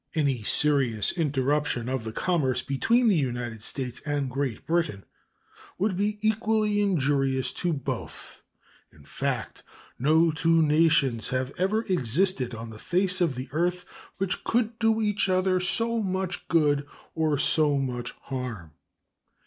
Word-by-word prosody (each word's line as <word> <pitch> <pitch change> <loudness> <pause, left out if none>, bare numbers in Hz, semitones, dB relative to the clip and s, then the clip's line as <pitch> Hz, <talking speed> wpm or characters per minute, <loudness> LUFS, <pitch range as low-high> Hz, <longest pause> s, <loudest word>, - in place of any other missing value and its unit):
Any 140 -6 +1
serious 125 -3 +2
interruption 145 -5 -1
of 130 -3 -3
the 110 - -4
commerce 130 -4 0
between 230 - +2
the 205 - +4
United 120 -6 -3
States 125 +1 -4
and 145 -3 -2
Great 135 -3 -3
Britain 165 - -1 0.7
would 195 +1 0
be 205 +2 -1
equally 215 -1 +1
injurious 135 -8 +1
to 175 - +1
both. 140 -5 -6 0.5
In 70 - -19
fact, 70 - -4 0.4
no 160 +5 +3
two 165 +1 +2
nations 150 -6 +2
have 130 +1 -2
ever 210 +5 +1
existed 145 - +1
on 115 0 -8
the 110 - -11
face 185 - +2
of 165 -7 +1
the 130 +1 -6
earth 175 +4 -1 0.3
which 195 -1 -2
could 230 -1 -1
do 225 -1 +2
each 210 -2 +1
other 185 0 +2
so 230 +5 +2
much 190 -2 -3
good 145 -4 +2 0.3
or 155 -2 0
so 145 0 +2
much 125 -3 -3
harm. 120 - -6
150 Hz, 140 wpm, -26 LUFS, 130-185 Hz, 0.7 s, the